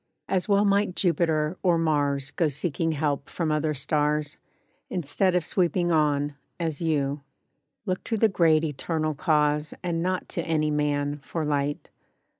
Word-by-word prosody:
As 190 +1 -1
well 200 +1 +4
might 200 -2 +2
Jupiter, 165 -2 +1
or 175 -3 +3
Mars 145 -4 0
Go 160 +3 +1
seeking 160 +2 -1
help 145 -2 -1
from 165 -3 -2
other 155 0 0
stars, 150 +1 0 0.5
Instead 180 +2 0
of 175 -3 +1
sweeping 175 -1 +1
ON, 145 -2 +2 0.3
as 160 -3 -2
you. 145 -3 0 0.6
Look 185 -2 -2
to 225 - -1
the 225 - +5
Great 165 -5 +3
Eternal 155 +1 -1
Cause 150 -1 +1
And 170 -2 -1
not 185 +1 -1
to 170 - -2
any 155 -2 0
man, 145 -1 0
for 155 +3 -4
light. 145 0 -2
155 Hz, 150 wpm, -26 LUFS, 145-175 Hz, 0.6 s, the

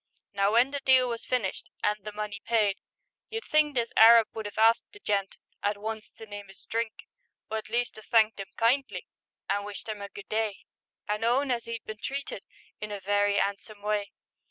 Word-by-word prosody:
Now 200 +1 +2
when 245 +4 +5
the 285 - -2
deal 260 -2 +5
was 235 -1 -4
finished 230 -7 -1
And 210 - +3
the 210 +2 -6
money 210 -1 -5
paid, 210 -4 +2 0.5
you'd 450 +1 -4
think 300 -2 +3
This 235 -2 0
Arab 225 0 +8
would 220 -1 -4
'ave 205 - -7
asked 225 +1 +4
the 415 - -13
gent 200 - -1 0.3
At 205 0 0
once 220 +1 -5
to 225 - -11
name 205 -2 -9
'is 195 - -14
drink, 225 -1 -3 0.5
Or 220 - 0
at 215 - -11
least 240 -1 -1
'ave 215 - -16
thanked 220 -2 +4
'im 195 - -6
kindly, 230 -5 +1 0.4
An' 200 +1 0
wished 205 +1 -7
'im 215 -2 -4
a 200 - -6
good 200 - -10
day, 215 -2 -2 0.4
And 210 +1 -1
own 255 +4 +2
as 235 -1 -1
'e'd 230 0 -5
been 215 -1 -7
treated 280 +1 -4 0.4
In 210 0 -5
a 205 - -4
very 205 +1 +2
'andsome 200 +1 -3
way. 210 -1 0
215 Hz, 205 wpm, -28 LUFS, 205-235 Hz, 0.5 s, Arab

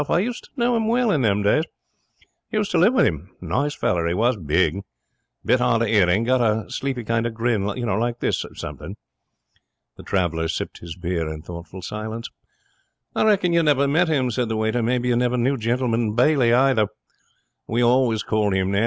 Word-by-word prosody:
I - - +3
used 235 +7 -2
to - - -21
know 240 0 +2
him 225 -1 0
well 240 -1 +2
in 150 - +1
them 105 -3 +1
days. 105 +10 +3 0.9
Used 210 -2 -1
to 170 - +2
live 215 +9 +4
with - - +4
him. 80 -4 -2
Nice 145 +2 -1
feller 85 -1 0
he 85 - 0
was. 120 +5 +2
Big. 90 +2 0 0.7
Bit - - +3
hard 115 0 +2
of 115 - -1
hearing. 100 -1 +3
Got 130 +1 +2
a 110 -4 +1
sleepy 135 -3 -3
kind 115 +1 0
of 115 - -7
grin, 115 -3 0
like 120 +2 -2
this - - -1
something.' - - -7 1.0
The - - -11
traveller 85 -4 -1
sipped 80 - -4
his 85 -1 -8
beer 85 -2 -3
in 80 0 -8
thoughtful 85 +1 -9
silence. 110 +3 -5 0.9
'I - - +2
reckon 195 -5 +3
you 170 - +4
never 145 -3 +3
met 160 +6 +2
him,' 135 -6 +1
said 120 0 -1
the 110 - -1
waiter. 110 +2 0
'Maybe 125 +2 0
you 120 - +2
never 125 +1 +1
knew 130 +3 +1
Gentleman 115 -2 -1
Bailey, 125 -1 +3
either? 125 -3 +3 0.8
We 120 +2 0
always 120 -3 +2
called 105 -3 0
him 95 0 0
that. 100 - +1
115 Hz, 195 wpm, -22 LUFS, 100-135 Hz, 1.0 s, live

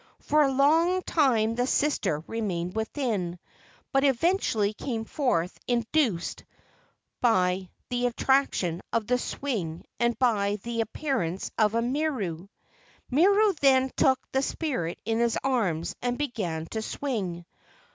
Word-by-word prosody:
For 305 0 +2
a 275 -2 +3
long 325 +7 +3
time 235 -8 +2
the 245 +2 0
sister 265 - +1
remained 185 -6 -3
within, 220 - -2 0.5
but 270 0 +2
eventually 265 - +2
came 225 0 -4
forth 195 - -1
induced 235 - 0 0.8
by 185 -5 +2 0.2
the 245 0 +1
attraction 240 -9 +1
of 230 -2 0
the 250 +3 +1
swing 200 - -4
and 235 0 +1
by 205 -5 +2
the 235 -1 -1
appearance 225 - -2
of 215 0 +2
Miru. 230 - -1 0.6
Miru 400 +8 +4
then 265 -1 +4
took 260 -1 +3
the 265 - +1
spirit 265 - -2
in 225 +1 0
his 235 -1 +2
arms 205 -12 0
and 245 0 -1
began 200 - -3
to 220 - -2
swing. 200 -10 -3
235 Hz, 125 wpm, -27 LUFS, 195-270 Hz, 0.8 s, Miru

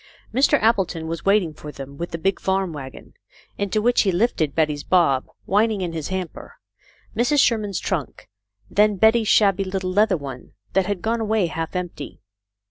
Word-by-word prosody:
Mr. 275 +4 +4
Appleton 195 -7 +1
was 165 -1 -5
waiting 195 -5 +3
for 150 0 -9
them 140 -1 -9
with 170 +4 -5
the 165 - -4
big 190 +3 0
farm 190 -2 -1
wagon, 135 -3 -10 0.5
into 200 +1 0
which 240 +1 +4
he 195 - +2
lifted 175 - 0
Betty's 150 -3 0
Bob, 140 -8 +2 0.2
whin 210 +4 +3
ing 210 -3 -3
in 175 -2 -3
his 160 -3 -4
hamper, 190 -2 -6 0.6
Mrs. 250 +6 +2
Sherman's 210 -7 +2
trunk, 165 -9 -4 0.4
and - - -17
then 210 0 +5
Betty's 220 +3 +4
shabby 200 -2 +4
little 185 -1 -3
leather 205 0 +3
one 135 -4 -9 0.2
that 190 -1 +2
had 200 -4 -3
gone 230 +1 0
away 215 -3 +1
half 165 +1 -4
empty. 175 -5 -5
190 Hz, 180 wpm, -22 LUFS, 165-210 Hz, 0.6 s, then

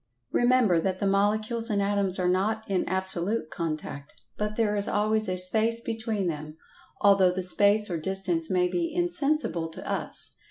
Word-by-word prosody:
Remember, 240 -8 +3
that 185 +2 -1
the 200 - -2
Molecules 215 +4 +1
and 205 -2 0
Atoms 200 -2 +2
are 180 -2 0
not 205 +5 0
in 190 -2 -1
absolute 190 0 0
contact, 155 -3 -5 0.2
but 210 0 -3
there 215 -2 +1
is 205 -1 +2
always 215 0 0
a 185 - -2
"space" 220 +5 +2
between 225 -3 -3
them, 155 -2 -5 0.4
although 195 -2 +5
the 185 +1 -3
space 205 +3 +2
or 175 - -3
distance 180 -2 0
may 180 -1 +2
be 335 - -2
"insensible" 305 - -1
to 160 - -9
us. - - -3
200 Hz, 165 wpm, -27 LUFS, 180-220 Hz, 0.4 s, although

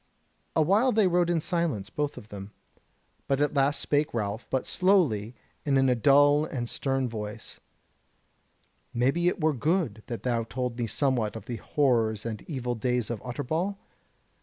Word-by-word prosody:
A 160 - +4
while 210 - +3
they 215 -2 +3
rode 175 -1 +2
in 170 -1 +2
silence, 155 - -2
both 150 -1 -2
of 105 - -11
them: 100 -1 -8 0.8
but 135 0 +1
at 145 0 +1
last 140 0 +2
spake 145 -2 0
Ralph, 105 0 -3
but 130 - -1
slowly 145 - +2 0.3
and 140 -2 +2
in 135 0 +4
a - - +5
dull 145 +4 +5
and 125 -6 -3
stern 135 +1 -1
voice: 105 -2 -7 1.4
"Maybe 135 +9 +2
it 180 - +1
were 155 -1 +2
good 150 - 0
that 120 -2 -5
thou 120 -2 0
told 125 +1 -3
me 120 - 0
somewhat 115 -2 0
of 110 -3 -8
the 120 -1 -4
horrors 115 -8 +1
and 110 -2 -4
evil 125 -5 -2
days 120 0 -1
of 115 - -4
Utterbol?" 160 +10 -2
130 Hz, 165 wpm, -27 LUFS, 115-155 Hz, 1.4 s, a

